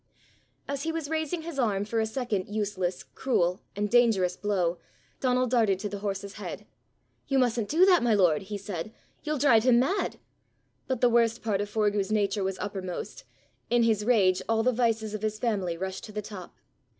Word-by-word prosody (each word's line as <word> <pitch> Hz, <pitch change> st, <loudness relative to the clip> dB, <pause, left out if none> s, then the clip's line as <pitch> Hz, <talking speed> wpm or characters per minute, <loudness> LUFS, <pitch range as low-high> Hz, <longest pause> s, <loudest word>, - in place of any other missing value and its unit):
As 280 Hz, -1 st, -3 dB
he 325 Hz, -, -1 dB
was 320 Hz, -2 st, -4 dB
raising 315 Hz, +1 st, -2 dB
his 325 Hz, -4 st, -6 dB
arm 205 Hz, -5 st, +1 dB
for 225 Hz, +2 st, -1 dB
a 220 Hz, -, +1 dB
second 220 Hz, -5 st, -2 dB
useless, 200 Hz, -4 st, -2 dB
cruel, 180 Hz, -8 st, 0 dB
and 205 Hz, +1 st, 0 dB
dangerous 210 Hz, -6 st, +3 dB
blow, 180 Hz, -4 st, -1 dB, 0.4 s
Donal 255 Hz, -1 st, +2 dB
darted 225 Hz, -6 st, +2 dB
to 205 Hz, +2 st, -4 dB
the 200 Hz, 0 st, -5 dB
horse's 200 Hz, 0 st, -4 dB
head. -, -, -6 dB, 0.6 s
"You 275 Hz, -, +1 dB
mustn't 235 Hz, -4 st, +1 dB
do 340 Hz, +5 st, +5 dB
that, 370 Hz, -2 st, +5 dB
my 235 Hz, -3 st, +3 dB
lord!" 175 Hz, -6 st, +3 dB
he 205 Hz, +2 st, -5 dB
said. 200 Hz, -1 st, -6 dB, 0.3 s
"You'll 305 Hz, 0 st, -2 dB
drive 255 Hz, -6 st, +4 dB
him 250 Hz, -1 st, +5 dB
mad." 355 Hz, +11 st, 0 dB, 0.7 s
But 260 Hz, -3 st, -2 dB
the 245 Hz, -, +5 dB
worst 230 Hz, 0 st, +2 dB
part 205 Hz, -3 st, 0 dB
of 205 Hz, -, -4 dB
Forgue's 210 Hz, -1 st, 0 dB
nature 205 Hz, -1 st, +1 dB
was 190 Hz, 0 st, -2 dB
uppermost, 190 Hz, -3 st, -5 dB, 0.4 s
in 240 Hz, 0 st, +3 dB
his 220 Hz, -2 st, +2 dB
rage 195 Hz, -6 st, +3 dB
all 225 Hz, 0 st, +2 dB
the 255 Hz, -, +3 dB
vices 225 Hz, -3 st, 0 dB
of 215 Hz, -, -4 dB
his 215 Hz, 0 st, -2 dB
family 200 Hz, -7 st, -1 dB
rushed 190 Hz, +1 st, -5 dB
to 215 Hz, -, -10 dB
the 210 Hz, 0 st, -4 dB
top. 195 Hz, -3 st, -9 dB
215 Hz, 190 wpm, -28 LUFS, 195-245 Hz, 0.7 s, do